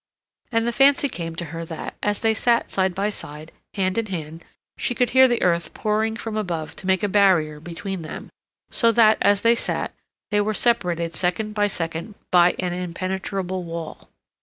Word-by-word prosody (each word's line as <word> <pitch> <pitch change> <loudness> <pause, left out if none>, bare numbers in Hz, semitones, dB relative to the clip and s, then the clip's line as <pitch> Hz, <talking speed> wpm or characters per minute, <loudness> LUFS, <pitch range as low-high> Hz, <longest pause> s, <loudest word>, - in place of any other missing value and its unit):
And 230 -1 +1
the 235 - +1
fancy 275 +3 +4
came 165 -9 -6
to 170 - -4
her 165 0 -4
that, 165 -1 -6
as 205 0 -1
they 225 -1 +3
sat 235 +1 +1
side 190 -2 0
by 200 +2 0
side, 150 -4 -9 0.2
hand 190 +1 0
in 225 - -2
hand, 165 -3 -6 0.3
she 245 - -2
could 250 0 +1
hear 260 +1 +7
the 240 -2 0
earth 170 -1 0
pouring 220 +1 0
from 225 -1 -5
above 170 -7 -3
to 190 - -6
make 190 0 +2
a - - +3
barrier 185 -7 +3
between 175 +3 -6
them, 155 - -8 0.4
so 230 -1 +3
that, 220 -1 +5
as 205 0 +3
they 230 0 +5
sat, 235 - -2 0.4
they 205 0 +3
were 215 +1 -1
separated 175 -9 +1
second 185 +6 -1
by 205 -1 +2
second 165 +1 -4 0.2
by 175 0 +5
an 180 -1 -2
impenetrable 185 +1 -3
wall. 165 -2 -7
190 Hz, 185 wpm, -23 LUFS, 170-220 Hz, 0.4 s, hear